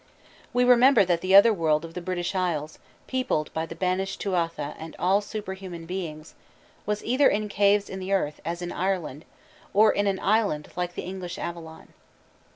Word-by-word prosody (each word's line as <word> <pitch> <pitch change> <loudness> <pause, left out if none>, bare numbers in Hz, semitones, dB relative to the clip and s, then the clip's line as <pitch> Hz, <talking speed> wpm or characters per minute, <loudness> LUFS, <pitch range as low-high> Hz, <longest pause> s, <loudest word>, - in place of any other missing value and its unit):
We 245 - +2
remember 245 -3 +6
that 175 -2 +1
the 190 +1 +3
Otherworld 165 -7 +5
of 165 - -11
the 180 - -5
British 175 +1 -3
Isles, 165 -5 -2 0.3
peopled 255 - -1
by 160 0 -2
the 165 - -8
banished 185 +2 -1
Tuatha 165 -6 -2
and 160 0 -8
all 195 +3 +2
superhuman 190 -5 -7
beings, 165 -3 -6 0.5
was 210 0 -1
either 260 +4 +4
in 210 +1 -1
caves 205 0 +3
in 190 - -6
the 190 +1 -5
earth, 150 -7 0
as 170 +1 -4
in 175 - -4
Ireland, 175 -6 -2 0.5
or 215 +1 +6
in 205 0 0
an 195 -1 0
island 200 -8 +1
like 180 0 -3
the - - -4
English 185 -1 -6
Avalon. 165 -2 -7
185 Hz, 170 wpm, -26 LUFS, 165-200 Hz, 0.5 s, remember